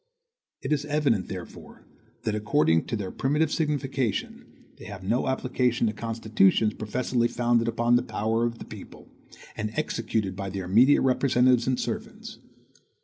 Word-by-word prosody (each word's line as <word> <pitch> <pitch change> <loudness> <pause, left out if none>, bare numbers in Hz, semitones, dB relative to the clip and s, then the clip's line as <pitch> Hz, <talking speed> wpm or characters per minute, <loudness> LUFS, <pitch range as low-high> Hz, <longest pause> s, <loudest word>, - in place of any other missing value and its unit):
It - - 0
is 145 -1 0
evident, 145 -10 +1
therefore, - - -10 0.4
that, 110 - -1
according 105 - +2
to 115 - -3
their 100 -4 -4
primitive 150 +3 0
signification, 140 - -2 0.3
they - - -11
have 100 -3 -8
no 115 +7 0
application 125 -2 0
to 110 - 0
constitutions 110 -2 +1
professedly 120 +3 -1
founded 120 -1 +1
upon 120 +1 +2
the - - +1
power 115 -1 -1
of 115 0 -3
the - - -9
people, - - -12 0.5
and 105 - -3
executed 110 -4 -2
by 100 0 -4
their 95 -1 -5
immediate 120 +10 +5
representatives 125 -2 +3
and 130 -1 +1
servants. - - -6
115 Hz, 145 wpm, -26 LUFS, 105-130 Hz, 0.5 s, immediate